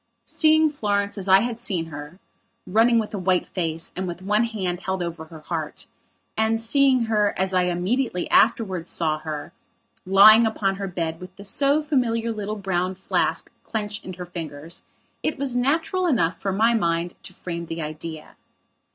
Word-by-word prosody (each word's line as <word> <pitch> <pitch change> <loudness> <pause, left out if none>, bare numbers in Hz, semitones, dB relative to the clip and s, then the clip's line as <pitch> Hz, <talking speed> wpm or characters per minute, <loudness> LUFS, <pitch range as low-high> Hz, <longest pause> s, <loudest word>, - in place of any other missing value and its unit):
Seeing 315 -1 +4
Florence, 205 -6 -1
as 195 -2 -4
I 190 +1 +7
had 235 0 -3
seen 185 -8 -1
her, 145 +4 -8 0.5
running 225 +5 +4
with 220 -1 -1
a 200 - -3
white 185 0 +1
face 165 -3 -3
and 185 0 -3
with 175 +1 -6
one 210 +4 +2
hand 190 -6 -3
held 190 -1 -2
over 170 -2 -5
her 160 -1 -12
heart, 155 -1 -5 0.5
and 220 +1 +1
seeing 260 +2 +3
her, 210 -2 +1
as 190 0 0
I 180 -1 +3
immediately 180 +3 -1
afterwards 190 -7 +2
saw 155 -2 0
her, 155 +1 -6 0.5
lying 215 +4 +8
upon 195 -3 -1
her 195 0 -4
bed 165 -3 -3
with 185 0 -11
the 200 - -11
so 280 +9 +1
familiar 235 -6 0
little 210 -1 -4
brown 190 -2 -1
flask 190 - -1
clenched 210 -1 -4
in 185 - -7
her 180 0 -7
fingers, 165 -2 -8 0.4
it 310 - -1
was 270 -2 -2
natural 325 +8 +1
enough 185 - +1
for 195 0 -1
my 225 +5 +3
mind 170 -4 0
to - - -9
frame 170 -1 -6
the 165 0 -4
idea. 155 +1 -8
195 Hz, 175 wpm, -23 LUFS, 175-225 Hz, 0.5 s, lying